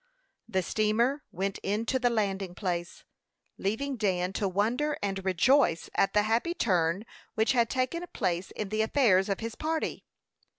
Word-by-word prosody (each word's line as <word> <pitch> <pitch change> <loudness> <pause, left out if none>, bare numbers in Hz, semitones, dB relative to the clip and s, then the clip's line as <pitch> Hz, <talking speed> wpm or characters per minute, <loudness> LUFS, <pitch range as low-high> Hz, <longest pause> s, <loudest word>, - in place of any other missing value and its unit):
The 190 -3 0
steamer 225 - +1
went 195 +2 -2
in 210 +3 -1
to 260 +3 +1
the 245 -1 +3
landing 195 -5 -1
place, 175 -3 -3 0.6
leaving 255 +7 -1
Dan 185 -3 0
to 200 - 0
wonder 240 +11 0
and 195 -1 -2
rejoice 190 - +3
at 195 - +2
the 210 - +5
happy 230 +11 0
turn 185 - +1 0.3
which 220 +1 +3
had 235 -3 +2
taken 260 +7 -1
place 175 +1 -1
in 210 -2 -3
the 215 +1 0
affairs 220 -5 +3
of 195 - -1
his 230 0 -4
party. 320 +4 -2
210 Hz, 160 wpm, -29 LUFS, 190-245 Hz, 0.6 s, the